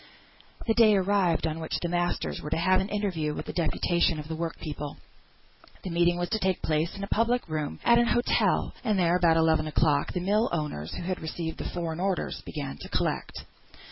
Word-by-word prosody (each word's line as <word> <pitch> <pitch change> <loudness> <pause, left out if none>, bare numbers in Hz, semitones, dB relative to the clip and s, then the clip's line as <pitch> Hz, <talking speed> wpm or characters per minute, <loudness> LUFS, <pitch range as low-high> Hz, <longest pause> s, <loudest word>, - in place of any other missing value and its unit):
The 225 - +2
day 220 -2 +6
arrived 190 -3 +2
on 160 0 -2
which 160 - -2
the 175 - -2
masters 175 0 -1
were 150 - -5
to - - 0
have 185 +3 +3
an 190 - -4
interview 180 -8 -1
with - - -6
a - - -4
deputation 170 0 +1
of 150 0 -6
the 160 - -4
work 165 -1 -3
people. 150 -2 -6 0.9
The 185 - -4
meeting 175 +1 +3
was 175 0 -2
to 220 - 0
take 190 -2 0
place 155 +2 0
in 200 - -5
a - - -3
public 235 +4 +1
room, 155 -2 -3
at 235 0 +6
an 240 - +3
hotel; 240 +1 +2
and 215 -4 +1
there, 175 -1 +3
about 170 -2 +4
eleven 160 -1 +3
o'clock, 150 -2 +1
the 180 - -1
mill 210 +6 +2
owners, 150 - -3
who - - -5
had 185 +1 -3
received 160 +1 -4
the - - -4
foreign 170 -2 -4
orders, 190 -1 -1
began 140 -3 -6
to - - -9
collect. - - -2
175 Hz, 210 wpm, -27 LUFS, 160-195 Hz, 0.9 s, day